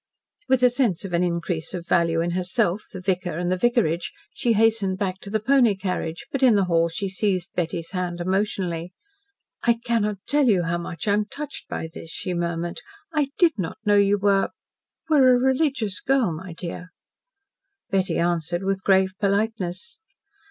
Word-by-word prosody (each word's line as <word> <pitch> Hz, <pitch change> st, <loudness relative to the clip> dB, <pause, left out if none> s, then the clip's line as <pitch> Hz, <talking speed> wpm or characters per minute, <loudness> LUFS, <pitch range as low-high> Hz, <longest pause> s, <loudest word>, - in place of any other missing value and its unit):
With 260 Hz, -1 st, +3 dB
a 250 Hz, -, +6 dB
sense 235 Hz, -8 st, 0 dB
of 185 Hz, -, -6 dB
an 170 Hz, -, +2 dB
increase 170 Hz, -2 st, -2 dB
of 170 Hz, -1 st, -6 dB
value 165 Hz, -2 st, +2 dB
in 170 Hz, +1 st, -1 dB
herself, 185 Hz, +2 st, 0 dB
the 185 Hz, -, -7 dB
vicar, 180 Hz, -3 st, -1 dB
and 175 Hz, +1 st, -1 dB
the -, -, +3 dB
vicarage, 185 Hz, -6 st, +1 dB, 0.2 s
she 235 Hz, -, +1 dB
hastened 215 Hz, -3 st, +2 dB
back 190 Hz, -1 st, -2 dB
to 200 Hz, -, -10 dB
the 220 Hz, +2 st, 0 dB
pony 240 Hz, -2 st, +4 dB
carriage, 180 Hz, -3 st, -3 dB
but 275 Hz, -, -2 dB
in 250 Hz, -4 st, +6 dB
the 200 Hz, -, +3 dB
hall 170 Hz, -2 st, +2 dB
she 195 Hz, +4 st, -3 dB
seized 190 Hz, -2 st, -1 dB
Betty's 170 Hz, -1 st, -3 dB
hand 180 Hz, -2 st, -3 dB
emotionally. 180 Hz, -2 st, -1 dB, 0.7 s
"I 235 Hz, -, +4 dB
cannot 230 Hz, -3 st, -1 dB
tell 290 Hz, -2 st, +2 dB
you 190 Hz, -6 st, +3 dB
how 170 Hz, +1 st, -1 dB
much 170 Hz, +3 st, -6 dB
I 200 Hz, -, +4 dB
am 210 Hz, 0 st, +1 dB
touched 290 Hz, +6 st, -7 dB
by 160 Hz, -, -4 dB
this," 165 Hz, -, -9 dB
she 180 Hz, +2 st, -4 dB
murmured. 170 Hz, 0 st, -3 dB, 0.3 s
"I 300 Hz, -3 st, +2 dB
did 330 Hz, -, +3 dB
not 170 Hz, -4 st, -3 dB
know 205 Hz, 0 st, +4 dB
you 200 Hz, 0 st, +4 dB
were 195 Hz, -1 st, +2 dB, 0.6 s
were 270 Hz, -5 st, +6 dB
a -, -, +5 dB
religious 260 Hz, -6 st, +1 dB
girl, 255 Hz, -9 st, +1 dB
my 170 Hz, +2 st, -7 dB
dear." 175 Hz, +1 st, -7 dB, 1.0 s
Betty 190 Hz, -2 st, +1 dB
answered 175 Hz, +1 st, 0 dB
with 195 Hz, 0 st, -1 dB
grave 190 Hz, -1 st, +3 dB
politeness. 200 Hz, -, -1 dB
190 Hz, 180 wpm, -24 LUFS, 175-225 Hz, 1.0 s, a